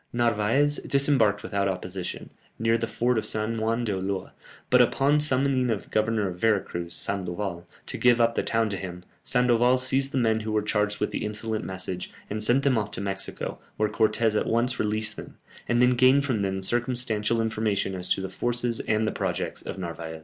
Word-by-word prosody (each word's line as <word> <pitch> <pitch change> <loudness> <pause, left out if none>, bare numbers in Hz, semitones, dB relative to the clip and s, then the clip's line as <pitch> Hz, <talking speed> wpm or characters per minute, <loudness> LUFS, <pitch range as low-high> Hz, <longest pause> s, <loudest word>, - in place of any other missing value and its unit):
Narvaez 120 +5 +2
disembarked 135 -7 +2
without 100 -1 -1
opposition, 95 -1 -4 0.3
near 115 +1 +1
to 115 - +2
the 115 - -2
fort 120 0 +1
of - - -4
San 110 +1 -1
Juan 115 +2 0
d'Ulloa, 95 -3 -3 0.4
but - - +7
upon 145 +2 +3
summoning 135 -3 +2
the 115 -3 +1
Governor 110 -1 +1
of 90 -1 -6
Vera 110 -1 +3
Cruz, 85 -2 -5
Sandoval, 90 -2 -3 0.2
to - - -3
give 120 -1 +4
up 115 0 +3
the - - 0
town 115 -1 0
to 100 - -2
him, 90 -1 -7 0.2
Sandoval 125 -1 +3
seized 135 +1 0
the - - -2
men 110 -3 +2
who 110 0 -4
were 105 -1 +1
charged 105 -1 0
with 105 - -1
the - - -3
insolent 110 +1 -2
message, 95 -1 -5 0.2
and 105 +1 -2
sent 120 +5 +2
them 130 -5 +3
off 105 -1 -3
to - - -7
Mexico, 95 0 -4 0.2
where 105 0 +1
Cortès 110 +1 +2
at - - 0
once 120 +2 0
released 105 0 -1
them, - - -10 0.3
and 120 +1 +3
then 125 - +5
gained 130 +3 +4
from 120 -7 0
them 95 -1 -2
circumstantial 120 -1 +1
information 110 -3 0
as 90 -1 -6
to - - +1
the 95 - -3
forces, 120 +1 -1
and 110 0 0
the - - 0
projects - - -3
of - - -7
Narvaez. 85 -3 -6
110 Hz, 200 wpm, -26 LUFS, 100-120 Hz, 0.4 s, but